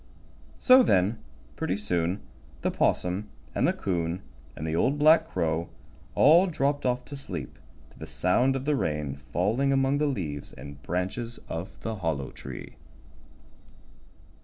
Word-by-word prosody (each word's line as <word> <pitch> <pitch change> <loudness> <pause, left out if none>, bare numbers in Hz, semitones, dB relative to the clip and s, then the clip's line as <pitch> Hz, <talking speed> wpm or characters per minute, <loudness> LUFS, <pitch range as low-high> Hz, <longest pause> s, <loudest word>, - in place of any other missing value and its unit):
So 255 0 +7
then, 100 - +2 0.4
pretty 95 - -1
soon, 90 -1 -1 0.4
the - - 0
'Possum 95 +4 0 0.2
and - - +2
the - - +4
'Coon 85 -1 -2 0.3
and 80 - -5
the 80 0 -1
Old 135 - +2
Black 160 +2 +6
Crow 85 - -1 0.5
all 170 +6 +6
dropped 145 -4 0
off 125 0 0
to 145 - -8
sleep 135 - -6 0.3
to - - -19
the - - -7
sound 125 +9 +2
of 135 0 -3
the 150 0 +2
rain 75 - -1
falling 115 - 0
among 135 +1 +2
the 150 - +2
leaves 80 - -4
and 70 -1 -10
branches 95 - -3
of 85 +4 -6
the 110 -1 -3
Hollow 80 -7 -2
Tree. - - -9
100 Hz, 145 wpm, -27 LUFS, 85-135 Hz, 0.5 s, So